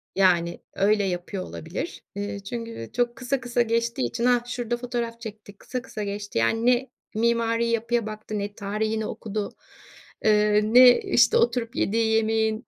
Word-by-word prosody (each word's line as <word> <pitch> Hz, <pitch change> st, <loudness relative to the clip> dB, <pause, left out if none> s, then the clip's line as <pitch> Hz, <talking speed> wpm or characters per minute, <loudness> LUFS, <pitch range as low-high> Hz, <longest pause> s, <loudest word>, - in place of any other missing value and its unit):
yani 175 Hz, -3 st, +3 dB
öyle 205 Hz, +1 st, +2 dB
yapıyor 185 Hz, +1 st, -3 dB
olabilir. 170 Hz, -, -6 dB
Eee, 205 Hz, 0 st, -4 dB
çünkü, 230 Hz, +2 st, -5 dB
eee, 115 Hz, -, -8 dB
çok 240 Hz, -1 st, 0 dB
kısa 250 Hz, +3 st, -2 dB
kısa 245 Hz, -1 st, 0 dB
geçtiği 230 Hz, -, 0 dB
için 235 Hz, -, -2 dB
hah, 245 Hz, -1 st, +3 dB
şurada 245 Hz, -1 st, -3 dB
fotoğraf 235 Hz, -1 st, -4 dB
çekti, 210 Hz, -2 st, -9 dB
kısa 250 Hz, +5 st, -5 dB
kısa 220 Hz, -4 st, -6 dB
geçti. 205 Hz, -, -4 dB
Yani 115 Hz, -, +2 dB
ne 250 Hz, +1 st, +3 dB, 0.3 s
mimari 230 Hz, 0 st, +2 dB
yapıya 230 Hz, 0 st, 0 dB
baktı 215 Hz, 0 st, -5 dB
ne 205 Hz, 0 st, -4 dB
tarihini 215 Hz, +2 st, -2 dB
okudu. 210 Hz, -1 st, -4 dB, 0.7 s
Eee, 210 Hz, -1 st, +4 dB
ne, 245 Hz, +3 st, +7 dB
işte, 470 Hz, -, +4 dB
oturup 250 Hz, -, +1 dB
yediği 225 Hz, -1 st, +1 dB
yemeğin 220 Hz, +1 st, +1 dB
225 Hz, 155 wpm, -25 LUFS, 205-240 Hz, 0.7 s, ne